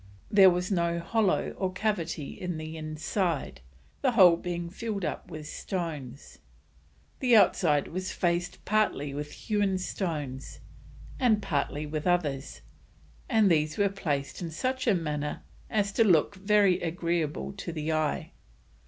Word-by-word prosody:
There 195 -3 +8
was 180 +2 -1
no 170 -2 +1
hollow 205 +3 +1
or 190 -1 0
cavity 175 -7 -2
in 180 -3 -5
the 155 0 -6
inside, 155 - -2 0.4
the 260 -3 +2
whole 185 -6 +8
being 175 0 -4
filled 200 +1 -4
up - - -4
with 155 -3 -7
stones. 150 - -5 0.8
The 250 -3 +4
outside 155 -8 +4
was 185 +2 -4
faced 175 0 -1
partly 200 -9 +1
with 150 +1 -5
hewn 205 -3 0
stones, 150 -8 -4 0.6
and 235 -5 +4
partly 150 -4 -2
with 155 +2 -3
others, 150 -6 -1 0.7
and 220 -5 +4
these 155 +1 +1
were 200 -1 +3
placed 150 -8 -3
in 170 - -3
such 255 +10 -2
a 215 - +5
manner 150 -3 -3 0.3
as 205 -2 +1
to 225 - +3
look 180 -4 +4
very 200 -1 +3
agreeable 170 -1 -2
to 185 - -5
the 155 -1 -3
eye. 155 -1 -1
175 Hz, 140 wpm, -28 LUFS, 155-200 Hz, 0.8 s, There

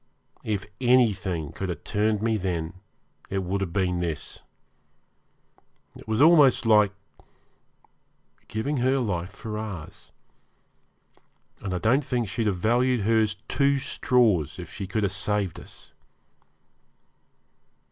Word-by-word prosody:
If 105 -5 -2 0.2
anything 105 - +2
could 95 - -5
have 85 - -5
turned 105 0 0
me 115 -1 +2
then 85 -5 -2 0.6
it 95 -1 -2
would 95 +2 -2
have 95 -3 -2
been 90 -1 0
this. 85 -4 -4 1.5
It - - -13
was 110 +5 +2
almost 150 -7 +6
like 105 -3 +5 1.6
giving 140 +7 -2
her 130 +2 +2
life 90 -8 -2
for 105 +1 -6
ours, 100 -8 -8 1.5
and 100 - -5
I 90 - -1
don't 120 +9 +2
think 120 -3 -1
she'd 110 +3 -1
have 100 -3 0
valued 120 +5 +2
hers 110 -1 +2
two 140 0 +2
straws 115 - +1
if - - -9
she 100 - -5
could 110 +3 -1
have 100 - +1
saved 105 -4 -1
us. - - -13
105 Hz, 125 wpm, -26 LUFS, 95-120 Hz, 1.6 s, almost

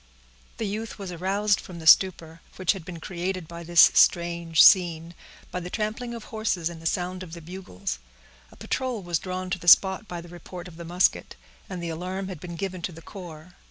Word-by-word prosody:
The 225 - -2
youth 215 +2 -4
was 195 -3 -6
aroused 195 +4 +1
from 180 - -10
the 160 - -9
stupor, 165 -2 +4
which 185 -2 +2
had 195 -5 -5
been 170 0 -8
created 180 0 -4
by 170 +1 -8
this 170 0 +7
strange 170 -2 +4
scene, 170 -3 +5 0.4
by 180 - -3
the 180 0 -7
trampling 225 +4 -3
of 230 - -8
horses, 215 -8 -2
and 165 -1 -10
the 165 - -2
sound 180 +2 -2
of 175 -3 -9
the 170 - -7
bugles. 170 - -6 0.5
A - - -16
patrol 250 -6 -3
was 175 -2 -1
drawn 185 0 -5
to 185 - -1
the 175 - -11
spot 190 +4 +6
by 175 -2 -6
the 170 - -10
report 175 +1 -9
of 165 -2 -13
the 170 - -8
musket, 175 +2 +1 0.3
and 180 -2 -5
the 170 - -3
alarm 185 +4 -4
had 180 -5 -7
been 175 0 -8
given 185 0 -4
to 180 - -3
the 165 0 -12
corps. 175 -3 -10
180 Hz, 210 wpm, -26 LUFS, 170-190 Hz, 0.5 s, this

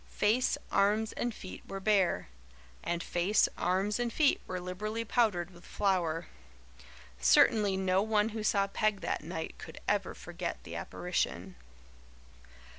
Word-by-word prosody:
Face, 225 +5 +2
arms 210 +2 +2
and 240 - -1
feet 190 -4 -9
were 195 - -5
bare 195 -3 +2 0.6
and 170 0 -2
face, 180 +4 +2
arms 190 +5 0
and 240 -1 0
feet 300 +1 +3
were 185 - -3
liberally 210 +6 -4
powdered 205 -7 +1
with 175 0 -16
FLOUR. 175 -5 0 0.9
Certainly 200 - +5
no 190 0 +2
one 215 0 +2
who 220 0 -4
saw 200 -2 +2
Peg 205 0 0
that - - -2
night 160 -1 -5
could - - -9
ever - - 0
forget - - -5
the - - -8
apparition. - - -2
200 Hz, 135 wpm, -31 LUFS, 180-215 Hz, 0.9 s, Certainly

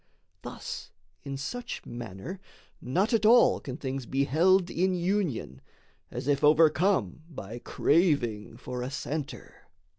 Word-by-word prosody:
Thus - - -7 0.3
in 140 0 -5
such 245 - -5
manner 120 - -7 0.4
not 190 - 0
at 220 -2 +2
all 235 +3 +6
can 130 -1 -7
things 135 -3 -4
Be 135 +1 +1
held 175 +6 +3
in 185 +2 +1
union, 170 - -1 0.5
as - - -6
if 145 0 +1
overcome 155 - +3
By 120 - -8
craving 140 - +1
for 125 -1 -6
a 125 - -3
centre. 140 +1 -6
150 Hz, 125 wpm, -28 LUFS, 125-185 Hz, 0.5 s, all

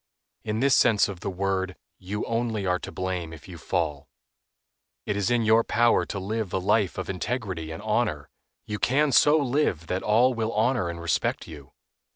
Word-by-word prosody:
In 110 +1 -2
this 140 0 +4
sense 110 -4 +4
of 95 -3 -7
the 100 - -4
word 95 0 -2 0.2
you 100 +3 -4
only 115 -3 -1
are 90 -1 +1
to - - -8
blame 90 -3 -3
if 80 -2 -12
you 90 -3 -10
fall. 75 -2 -2 1.0
It 105 - -1
is 100 +1 0
in 120 -1 +2
your 110 +1 +4
power 120 +1 +2
to - - -4
live 100 +1 -3
a - - +2
life 95 +1 +1
of 95 -2 -4
integrity 95 -3 -3
and 80 +6 -7
honor. 105 -10 -1 0.4
You 105 -1 -4
can 145 +3 +2
so 150 +4 +5
live 135 - 0
that 90 +3 -2
all 120 +5 +3
will 115 -1 -2
honor 115 -3 +1
and 85 0 -6
respect 85 -2 -1
you. 70 -4 -12
100 Hz, 190 wpm, -26 LUFS, 90-115 Hz, 1.0 s, so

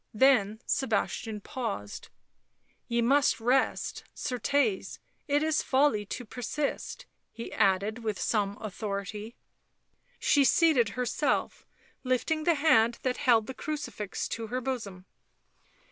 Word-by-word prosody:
Then 220 -4 +4
Sebastian 220 -3 -1
paused. 200 - -5 0.4
" - - -42
Ye 235 0 +1
must 275 +2 +3
rest, 250 +4 +1
certes, 280 - 0 0.3
it 290 +1 +2
is 315 -1 +2
folly 260 -7 +2
to 245 - -5
persist," 255 +6 -4 0.3
he 230 - -8
added, 200 +4 +2
with 215 -4 -3
some 205 -2 0
authority. 210 +1 -5 0.8
She 285 - +3
seated 275 -6 +4
herself, 250 -1 -1 0.4
lifting 290 +5 0
the 340 - +4
hand 235 -6 +4
that 255 -1 0
held 230 -5 +3
the 265 - -6
crucifix 290 -10 -4
to 225 -1 -4
her 250 +4 -2
bosom. 220 -8 -5
240 Hz, 115 wpm, -29 LUFS, 210-275 Hz, 0.8 s, Then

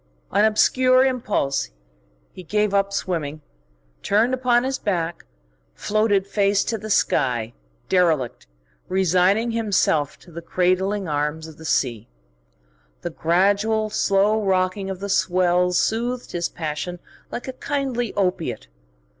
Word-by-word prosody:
On 200 +2 +3
obscure 255 +4 +4
impulse 210 - -1 0.6
he - - -9
gave 210 +3 0
up 200 0 +2
swimming, 155 -6 -3 0.6
turned 225 +5 +2
upon 245 -1 +2
his 265 +1 -2
back, 170 -4 -2 0.5
floated 205 - +1
face 200 0 +1
to 225 -1 -3
the 215 +2 -7
sky, 120 - +1 0.3
derelict, 165 -9 +1 0.4
resigning 190 +5 +2
himself 200 -10 +1
to 175 - -18
the 170 +1 -7
cradling 185 +3 0
arms 150 +1 -2
of 160 -1 -13
the 160 - -10
sea. 120 - -1 0.9
The 175 - -4
gradual, 205 +7 +1
slow 210 +1 +2
rocking 190 0 0
of 190 -1 -6
the 200 - -3
swells 180 -2 +2
soothed 240 +3 -1
his 175 -1 -2
passion 160 +2 -4 0.3
like 245 - -6
a 260 - -4
kindly 255 -4 -2
opiate. 180 - -2
195 Hz, 125 wpm, -22 LUFS, 170-215 Hz, 0.9 s, obscure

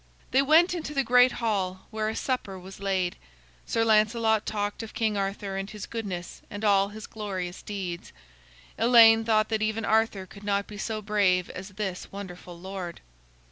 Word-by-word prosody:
They 265 - +5
went 320 +6 +5
into 315 -4 -5
the 275 - +2
great 250 0 +5
hall 190 -5 -2
where 215 0 -1
a 220 - -4
supper 250 -7 -2
was 185 +1 -11
laid. 190 -3 -1 0.5
Sir 225 0 +1
Lancelot 220 0 +3
talked 205 0 -2
of 225 - -9
King 220 -2 +1
Arthur 195 0 -2
and 195 +1 -4
his 210 -1 -7
goodness 195 -6 -5
and 205 +1 -5
all 200 -1 +4
his 215 +1 -9
glorious 190 -4 -5
deeds. 185 -4 -5 0.7
Elaine 225 -1 +7
thought 215 -1 +2
that 220 -1 0
even 220 +1 -1
Arthur 220 -3 +2
could 200 +2 -14
not 200 -1 0
be 205 -1 -10
so 215 -1 -3
brave 195 -4 +2
as 185 +2 -8
this 190 -2 -5
wonderful 180 -3 -9
lord. 185 -2 -6
210 Hz, 175 wpm, -27 LUFS, 195-225 Hz, 0.7 s, Elaine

